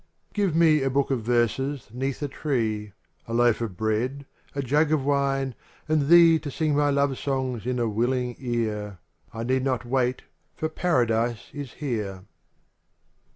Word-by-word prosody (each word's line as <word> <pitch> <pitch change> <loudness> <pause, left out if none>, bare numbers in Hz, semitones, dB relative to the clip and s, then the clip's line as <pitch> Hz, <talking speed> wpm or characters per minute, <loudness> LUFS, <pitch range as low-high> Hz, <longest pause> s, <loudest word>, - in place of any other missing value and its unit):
xn - - -30
Give 200 -6 +1
me 160 -3 +5
a 135 - +1
book 140 +1 +1
of 130 -3 0
verses 120 +4 0
'neath 135 +3 -3
a - - 0
tree, 110 -8 -2 0.3
A 115 - -3
loaf 120 -1 +3
of 105 -6 -4
bread* 120 +6 -1 0.3
a 140 - -1
jug 145 +4 +2
of 150 -4 +1
wine 135 -2 +1 0.3
and 155 -2 +2
thee 165 0 +7
To 150 - -6
sing 155 +1 0
thy 145 0 +3
love 140 -1 +2
songs 130 -4 -2
in 125 0 0
a 120 -1 +1
willing 120 +3 0
ear, 110 -5 -2 0.3
I 115 -1 -5
need 130 +2 +1
not 130 -3 -1
wait, 125 0 0 0.3
for 155 - -2
Paradise 120 - 0
is 145 -4 -7
here. 105 -10 -4
130 Hz, 165 wpm, -25 LUFS, 115-145 Hz, 0.3 s, thee